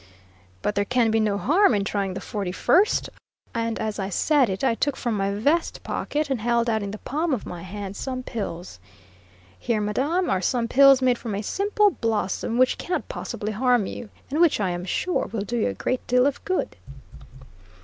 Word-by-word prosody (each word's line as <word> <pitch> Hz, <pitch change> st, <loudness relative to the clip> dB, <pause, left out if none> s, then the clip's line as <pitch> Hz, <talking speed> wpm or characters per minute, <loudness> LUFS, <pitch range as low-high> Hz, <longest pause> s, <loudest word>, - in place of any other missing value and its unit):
"But -, -, 0 dB
there 205 Hz, 0 st, +1 dB
can 235 Hz, +1 st, +2 dB
be 225 Hz, -, +2 dB
no 210 Hz, -2 st, +1 dB
harm 320 Hz, -, +3 dB
in 200 Hz, -, 0 dB
trying 200 Hz, -2 st, -2 dB
the -, -, -5 dB
forty 200 Hz, -4 st, -4 dB
first;" 380 Hz, -, +3 dB, 0.5 s
and 230 Hz, -1 st, -1 dB
as 215 Hz, -1 st, -3 dB
I 195 Hz, 0 st, -2 dB
said 275 Hz, -, +2 dB
it 190 Hz, +4 st, -3 dB
I 265 Hz, -, +3 dB
took 285 Hz, +4 st, -1 dB
from 240 Hz, -2 st, -2 dB
my 195 Hz, -1 st, 0 dB
vest 285 Hz, +12 st, 0 dB
pocket 300 Hz, +1 st, -2 dB
and 250 Hz, -5 st, -1 dB
held 235 Hz, +1 st, +1 dB
out 220 Hz, -2 st, +1 dB
in 200 Hz, -, -4 dB
the 210 Hz, -, -6 dB
palm 300 Hz, +5 st, -1 dB
of 225 Hz, -, -8 dB
my 175 Hz, -1 st, -7 dB
hand 195 Hz, +2 st, -7 dB
some 255 Hz, +1 st, -4 dB
pills: 180 Hz, -, -6 dB, 0.8 s
"Here, 235 Hz, -3 st, 0 dB
madame, 280 Hz, -, 0 dB
are 185 Hz, -, +1 dB
some 235 Hz, +3 st, 0 dB
pills 275 Hz, +1 st, +6 dB
made 250 Hz, -2 st, +3 dB
from 220 Hz, -4 st, -4 dB
a 205 Hz, -, -3 dB
simple 410 Hz, -, +2 dB
blossom, 225 Hz, -, -1 dB
which 255 Hz, 0 st, +3 dB
cannot 360 Hz, -, -3 dB
possibly 210 Hz, +1 st, -4 dB
harm 245 Hz, 0 st, +2 dB
you, 215 Hz, -, -7 dB, 0.2 s
and 305 Hz, +4 st, +1 dB
which, 340 Hz, -8 st, +4 dB
I 190 Hz, -3 st, 0 dB
am 175 Hz, +1 st, -4 dB
sure, 360 Hz, -, -1 dB
will 220 Hz, -2 st, -2 dB
do 235 Hz, +4 st, -4 dB
you -, -, +1 dB
a 100 Hz, -, -2 dB
great 255 Hz, -, -2 dB
deal 250 Hz, +1 st, +4 dB
of 285 Hz, 0 st, -1 dB
good." 370 Hz, -, -1 dB
230 Hz, 205 wpm, -24 LUFS, 205-270 Hz, 0.8 s, pills